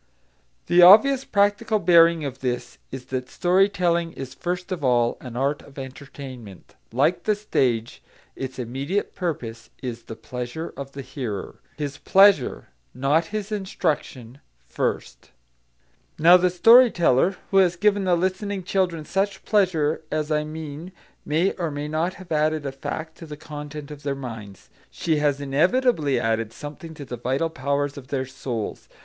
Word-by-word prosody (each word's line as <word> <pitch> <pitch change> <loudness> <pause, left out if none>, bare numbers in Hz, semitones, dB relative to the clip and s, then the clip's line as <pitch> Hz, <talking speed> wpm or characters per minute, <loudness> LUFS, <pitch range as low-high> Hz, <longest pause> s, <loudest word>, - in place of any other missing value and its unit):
The 175 +1 +5
obvious 235 +9 +8
practical 205 +2 +2
bearing 170 -3 +5
of 135 -1 -5
this 125 -2 -4
is 130 -1 -8
that 130 0 -3
story 185 +3 +3
telling 170 -3 0
is 135 -1 -7
first 180 +1 -4
of 175 -5 -3
all 120 -2 +2
an 125 -2 -9
art 140 +3 0
of 140 - -17
entertainment; 130 - -10 0.2
like 180 - +1
the 215 - +2
stage, 125 - -1 0.3
its 130 -1 -6
immediate 135 - -3
purpose 120 -10 -5
is 120 -2 -5
the 115 - -8
pleasure 125 +8 -6
of 140 0 -8
the 140 - -7
hearer, 125 -6 -6 0.2
his 145 -1 -4
pleasure, 195 -8 +4 0.3
not 140 +6 +2
his 210 +3 -5
instruction, 155 - -3 0.3
first. - - -3 0.9
Now 170 +3 +7
the 180 0 +4
story 230 +8 +7
teller 175 - +2
who 195 - +3
has 180 -2 +4
given 205 +1 +2
the 180 -1 +3
listening 190 +2 -2
children 175 -4 -1
such 195 +2 -2
pleasure 175 -8 +1
as 155 0 -2
I 150 0 +1
mean 155 +3 -7 0.3
may 165 +6 +1
or 170 -3 -3
may 145 0 -4
not 160 +4 -1
have 185 -2 -13
added 155 -1 +1
a 135 - -2
fact 160 +4 -6
to 165 - -9
the 150 -1 -8
content 150 -1 -8
of 145 -1 -9
their 140 -1 -2
minds; 115 -7 -9 0.2
she 160 -2 -1
has 145 -2 +1
inevitably 150 - +2
added 115 -1 -1
something 155 +2 -9
to 145 - -8
the 125 - -6
vital 135 +7 -1
powers 140 0 -2
of 130 - -14
their 130 -1 -2
souls. 125 -4 -5
150 Hz, 160 wpm, -24 LUFS, 135-180 Hz, 0.9 s, obvious